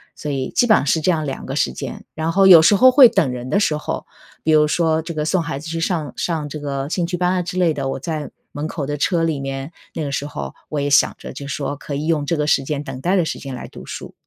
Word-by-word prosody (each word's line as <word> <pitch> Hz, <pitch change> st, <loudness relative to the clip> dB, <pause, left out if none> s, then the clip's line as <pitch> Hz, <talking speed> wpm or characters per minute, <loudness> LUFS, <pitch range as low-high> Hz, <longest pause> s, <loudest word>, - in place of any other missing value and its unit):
所 150 Hz, -, -5 dB
以 130 Hz, -2 st, -3 dB
基 245 Hz, -, +2 dB
本 215 Hz, -, +6 dB
上 140 Hz, -, -1 dB
是 160 Hz, +3 st, +2 dB
这 185 Hz, -, +1 dB
样 155 Hz, -3 st, +1 dB
两 135 Hz, -, -5 dB
个 -, -, -4 dB
时 -, -, +1 dB
间， -, -, -7 dB
然 160 Hz, +1 st, -2 dB
后 195 Hz, +2 st, +4 dB
有 175 Hz, -4 st, +10 dB
时 185 Hz, +6 st, +5 dB
候 255 Hz, +6 st, +7 dB
会 255 Hz, -2 st, +8 dB
等 135 Hz, -5 st, +1 dB
人 125 Hz, 0 st, -6 dB
的 200 Hz, -, +2 dB
时 155 Hz, -7 st, +1 dB
候， 150 Hz, -, -4 dB, 0.4 s
比 160 Hz, -, +2 dB
如 150 Hz, -1 st, +5 dB
说 160 Hz, 0 st, +1 dB
这 165 Hz, 0 st, -7 dB
个 150 Hz, -, -1 dB
送 180 Hz, +3 st, +1 dB
孩 155 Hz, -4 st, -4 dB
子 155 Hz, +3 st, -8 dB
去 165 Hz, 0 st, -3 dB
上 165 Hz, -4 st, -2 dB
上 160 Hz, -4 st, -2 dB
这 150 Hz, +1 st, -6 dB
个 140 Hz, -1 st, -3 dB
兴 170 Hz, +1 st, -1 dB
趣 180 Hz, 0 st, -3 dB
班 180 Hz, 0 st, +1 dB
啊 185 Hz, -, +1 dB
之 180 Hz, +1 st, -5 dB
类 170 Hz, -4 st, +3 dB
的， 135 Hz, -2 st, -3 dB
我 135 Hz, -, -3 dB
在 155 Hz, +1 st, -4 dB, 0.2 s
门 150 Hz, +2 st, -4 dB
口 150 Hz, -4 st, -4 dB
的 145 Hz, +1 st, -3 dB
车 165 Hz, +3 st, +1 dB
里 160 Hz, -3 st, 0 dB
面， 135 Hz, +2 st, -5 dB, 0.2 s
那 160 Hz, -, -2 dB
个 140 Hz, -, -3 dB
时 140 Hz, +1 st, -2 dB
候 70 Hz, -, -6 dB, 0.2 s
我 150 Hz, -, -2 dB
也 140 Hz, -, -1 dB
想 140 Hz, -, +4 dB
着 -, -, -9 dB
就 140 Hz, +1 st, -8 dB
说 145 Hz, 0 st, -3 dB
可 145 Hz, 0 st, -6 dB
以 150 Hz, -, -3 dB
用 155 Hz, -3 st, 0 dB
这 165 Hz, -, 0 dB
个 150 Hz, -, 0 dB
时 145 Hz, -2 st, +2 dB
间 145 Hz, +1 st, -3 dB
等 135 Hz, -2 st, -7 dB
待 180 Hz, +5 st, +1 dB
的 180 Hz, -, +2 dB
时 -, -, -4 dB
间 135 Hz, -2 st, -7 dB
来 125 Hz, -, -7 dB
读 -, -, -12 dB
书。 -, -, -7 dB
155 Hz, 320 characters per minute, -20 LUFS, 140-170 Hz, 0.4 s, 有